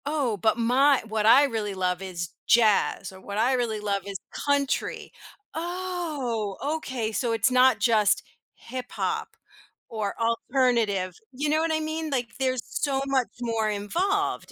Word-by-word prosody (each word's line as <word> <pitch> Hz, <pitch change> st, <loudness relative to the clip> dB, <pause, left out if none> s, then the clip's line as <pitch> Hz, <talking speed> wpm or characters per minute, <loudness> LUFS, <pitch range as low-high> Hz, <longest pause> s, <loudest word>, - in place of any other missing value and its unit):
Oh, 280 Hz, -7 st, 0 dB
but 220 Hz, +4 st, +2 dB
my 260 Hz, +4 st, +4 dB
what 215 Hz, -1 st, -1 dB
I 260 Hz, +6 st, +8 dB
really 220 Hz, -6 st, -2 dB
love 180 Hz, -1 st, -1 dB
is 175 Hz, -3 st, -5 dB, 0.2 s
jazz 215 Hz, -4 st, +3 dB
or 190 Hz, 0 st, -13 dB
what 200 Hz, +1 st, -6 dB
I 245 Hz, +4 st, +3 dB
really 235 Hz, -4 st, 0 dB
love 200 Hz, -1 st, -1 dB
is 200 Hz, -1 st, -4 dB
country. 285 Hz, -1 st, -1 dB, 0.4 s
"Oh, 320 Hz, -, -3 dB, 0.2 s
okay." 250 Hz, -7 st, -3 dB
So 230 Hz, +1 st, -1 dB
it's 225 Hz, +3 st, +2 dB
not 255 Hz, -3 st, +5 dB
just 215 Hz, -1 st, +3 dB, 0.3 s
hip 255 Hz, +1 st, -7 dB
hop -, -, -3 dB, 0.5 s
or 215 Hz, -3 st, -3 dB
alternative, 230 Hz, -5 st, +1 dB, 0.2 s
you 285 Hz, +3 st, -2 dB
know 310 Hz, +1 st, +3 dB
what 325 Hz, 0 st, 0 dB
I 315 Hz, -, +1 dB
mean? 315 Hz, 0 st, -3 dB
Like 250 Hz, -4 st, -1 dB
there's 255 Hz, -2 st, 0 dB
so 275 Hz, -2 st, -1 dB
much 265 Hz, -3 st, +1 dB
more 225 Hz, -2 st, 0 dB
involved 355 Hz, -, -1 dB
240 Hz, 155 wpm, -26 LUFS, 210-280 Hz, 0.5 s, I